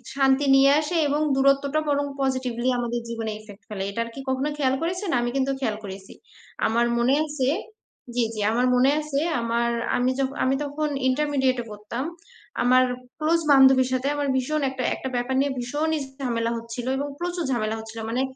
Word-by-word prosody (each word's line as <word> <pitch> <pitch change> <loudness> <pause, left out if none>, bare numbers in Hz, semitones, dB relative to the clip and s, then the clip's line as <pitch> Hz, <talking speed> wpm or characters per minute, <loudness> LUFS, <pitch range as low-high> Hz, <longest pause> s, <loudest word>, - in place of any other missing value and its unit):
শান্তি 270 +1 +3
নিয়ে 275 +1 +6
আসে। 340 +3 -3
এবং 295 +2 0
দূরত্বটা 275 +2 +3
বরং 285 0 +1 0.2
positively 255 -2 0
আমাদের 240 0 -2
জীবনে 225 -1 -3
effect 205 -1 -14
ফেলে। 195 -2 -4
এটা 200 - -5
আর - - -8
কি - - -7
কখনো 265 +3 0
খেয়াল 265 -2 +2
করেছেন? 360 +3 -2
আমি 240 0 0
কিন্তু 270 0 +1
খেয়াল 220 -6 -1
করেছি। 190 0 -9 0.5
আমার 235 +2 +2
মনে 245 +3 +3
আছে 290 -4 -2 0.7
জ্বী, 240 -2 +2
জ্বী 215 - -4
আমার 245 +2 +2
মনে 260 +3 +4
আছে 290 -2 -2 0.2
আমার 235 +1 0 0.3
আমি 250 +1 +2
যখন 270 +1 -1
আমি 265 +1 +2
তখন 295 +2 -2 0.2
intermediate-এ 265 -3 +1
পড়তাম। 210 +5 -5 0.6
আমার 255 +1 +5 0.4
close 325 +2 +2
বান্ধবীর 265 -1 +6
সাথে 255 +2 0
আমার 290 -1 -1
ভীষণ 300 +4 0
একটা, 260 -1 -4
একটা 265 - -5
ব্যাপার 245 +2 -1
নিয়ে 280 -1 0
ভীষণই 300 +6 -1 0.2
ঝামেলা 230 -2 -1
হচ্ছিল। 230 +1 -6
এবং 285 +1 -2
প্রচুর 350 -1 -2
ঝামেলা 220 -2 0
হচ্ছিল। 220 +1 -8
মানে 245 +3 0
260 Hz, 175 wpm, -24 LUFS, 235-285 Hz, 0.7 s, নিয়ে